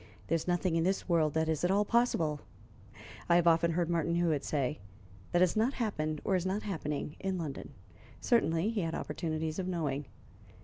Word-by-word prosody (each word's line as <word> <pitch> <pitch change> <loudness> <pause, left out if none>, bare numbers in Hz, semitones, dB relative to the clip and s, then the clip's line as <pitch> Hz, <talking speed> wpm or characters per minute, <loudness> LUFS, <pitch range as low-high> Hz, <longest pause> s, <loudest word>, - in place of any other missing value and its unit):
"There - - +3
is 165 - -3
nothing 175 -1 +1
in 165 - +2
this 190 +2 0
world 160 -4 +2
that 160 0 +1
is 160 0 -1
at 180 - +3
all 200 +2 +3
possible," 185 -11 +1 0.9
I 170 - +6
have 175 -1 +4
often 170 0 +4
heard 170 0 +1
Martin 170 0 0
Hewitt 165 -4 +1
say, 145 -1 -1 0.5
"that 175 - +3
has 180 -2 +3
not 225 +5 +2
happened 155 - -2
or 195 - +2
is 180 - 0
not 190 +3 -2
happening 150 -6 -4
in 190 -1 -2
London." 155 -5 -5 0.5
Certainly 205 -5 +2
he 220 -3 -1
had 165 -1 -2
opportunities 160 0 -3
of 185 - -2
knowing. 145 -6 -2
170 Hz, 190 wpm, -31 LUFS, 155-185 Hz, 0.9 s, I